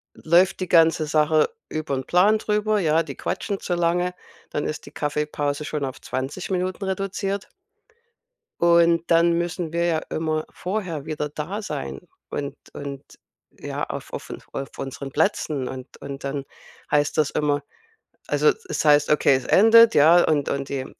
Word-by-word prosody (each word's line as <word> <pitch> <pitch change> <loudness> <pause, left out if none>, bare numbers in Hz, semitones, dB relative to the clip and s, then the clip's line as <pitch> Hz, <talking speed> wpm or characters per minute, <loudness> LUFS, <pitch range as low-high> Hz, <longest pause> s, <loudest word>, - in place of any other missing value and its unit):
läuft 180 +4 +3
die 185 - -1
ganze 165 -2 +4
Sache 155 0 +3 0.2
über 155 -2 -3
'n 130 - -4
Plan 205 +5 +4
drüber, 210 0 +1
ja, 165 -2 +2
die 140 -3 -8
quatschen 200 -1 -3
zu 175 - -2
lange, 175 +1 0 0.3
dann 150 - -2
ist 155 - -5
die - - -10
Kaffeepause 150 0 -2
schon 150 -2 -2
auf 130 - -7
20 130 +7 -4
Minuten 185 +1 -2
reduziert. 195 +1 -3 1.1
Und 170 -1 +4
dann 170 +1 +5
müssen 170 -1 -3
wir 170 0 +1
ja 165 -2 +1
immer 155 -1 -1
vorher 180 -6 -4
wieder 150 -1 -3
da 165 +8 -5
sein 70 - -5 0.3
und 140 -1 -4 0.2
und 140 -1 -6 0.6
ja, - - -4
auf - - -6
offen - - -6
auf 135 - -4
unseren 135 0 -6
Plätzen. 150 -4 0
Und 130 0 -7
und 140 0 -7
dann 140 0 -3 0.5
heißt 145 0 +2
das 150 -2 +3
immer 145 -1 0 0.7
also 450 - +3 0.2
es 400 - -2
heißt, 145 -1 +5
okay, 145 -2 +4
es 130 -1 -3
endet, 230 +3 +7
ja, 165 +4 +7
und 145 -3 +1
und 140 0 -3
die 135 -2 -3
155 Hz, 160 wpm, -23 LUFS, 145-180 Hz, 1.1 s, endet